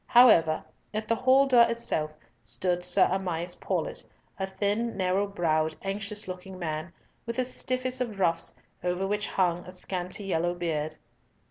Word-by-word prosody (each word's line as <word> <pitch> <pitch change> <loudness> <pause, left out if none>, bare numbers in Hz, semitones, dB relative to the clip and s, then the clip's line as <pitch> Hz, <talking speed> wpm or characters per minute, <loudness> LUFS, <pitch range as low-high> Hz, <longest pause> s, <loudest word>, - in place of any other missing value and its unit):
However, 190 -12 +6 0.3
at 215 0 -2
the 230 - +3
hall 260 +3 +5
door 240 -3 +6
itself 230 -10 -1 0.3
stood 175 - -1
Sir 180 0 +4
Amias 180 -2 -1
Paulett, - - -2 0.4
a 190 - -1
thin, 205 +4 -1
narrow 190 +2 +1
browed, 160 -5 +1
anxious 200 +1 -3
looking 185 +1 -7
man, 160 -1 -3 0.4
with 235 - -2
the 255 0 +1
stiffest 255 0 -2
of 225 -5 -2
ruffs, 165 -3 0 0.3
over 180 +1 0
which 210 +1 -1
hung 175 -2 +1
a - - -7
scanty 185 +2 -4
yellow 175 -2 0
beard. 155 -3 -2
190 Hz, 150 wpm, -28 LUFS, 175-215 Hz, 0.4 s, However